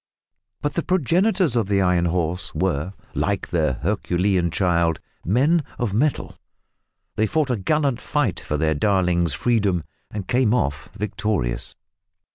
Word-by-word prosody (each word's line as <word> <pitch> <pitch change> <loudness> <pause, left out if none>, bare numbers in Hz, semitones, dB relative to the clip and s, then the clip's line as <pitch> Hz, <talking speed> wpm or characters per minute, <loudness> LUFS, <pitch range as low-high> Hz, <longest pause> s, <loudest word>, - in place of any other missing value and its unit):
But 145 -1 0
the 170 - 0
progenitors 180 - +2
of 115 -5 +1
the 100 -1 +2
Iron 90 -2 +2
Horse 85 +1 -1
were, 90 -1 -1 0.2
like 100 -1 -1
their 80 -6 +1
Herculean 95 -2 +1
child, 85 -1 +1 0.2
men 145 - +3
of 115 -5 -1
mettle. 140 +7 0 0.8
They 110 - +2
fought 150 +1 0
a - - +2
gallant 135 +4 0
fight 145 -10 0
for 75 - -3
their 80 +1 +2
darling's 85 -2 +1
freedom, 100 - +1 0.3
and 105 -3 -6
came 125 -2 +3
off 75 - -1
victorious! 100 - -1
100 Hz, 135 wpm, -23 LUFS, 85-125 Hz, 0.8 s, men